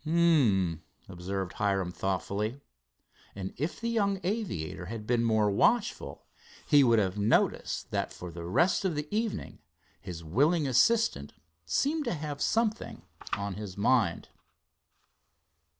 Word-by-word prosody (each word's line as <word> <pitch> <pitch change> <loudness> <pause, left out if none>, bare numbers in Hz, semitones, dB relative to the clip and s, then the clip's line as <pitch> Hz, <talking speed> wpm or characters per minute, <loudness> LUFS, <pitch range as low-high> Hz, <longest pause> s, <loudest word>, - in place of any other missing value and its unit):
"Um 135 - +3
m," - - -34 0.3
observed 95 +1 -4
Hiram 95 -3 0
thoughtfully, 100 +6 -2 0.8
and, 95 -1 -5
if 150 +6 -3
the 230 - -3
young 200 -4 +1
aviator 95 - -3
had 110 0 -6
been 120 0 +1
more 110 -2 +2
watchful, 230 - +1 0.4
he 145 -2 +6
would 115 -3 +4
have 100 -1 0
noticed 105 +3 +1
that - - -1
for 90 -1 -8
the 85 +1 -8
rest 170 - +2
of 185 -5 0
the 150 0 -3
evening 225 -1 -3 0.4
his 85 -3 -7
willing 145 - +2
assistant 130 - +2 0.3
seemed 295 - 0
to - - -1
have 150 -2 -5
something 225 -1 -1 0.3
on 100 -1 -2
his 100 -2 -7
mind. 100 -4 +1
115 Hz, 135 wpm, -29 LUFS, -, 0.8 s, he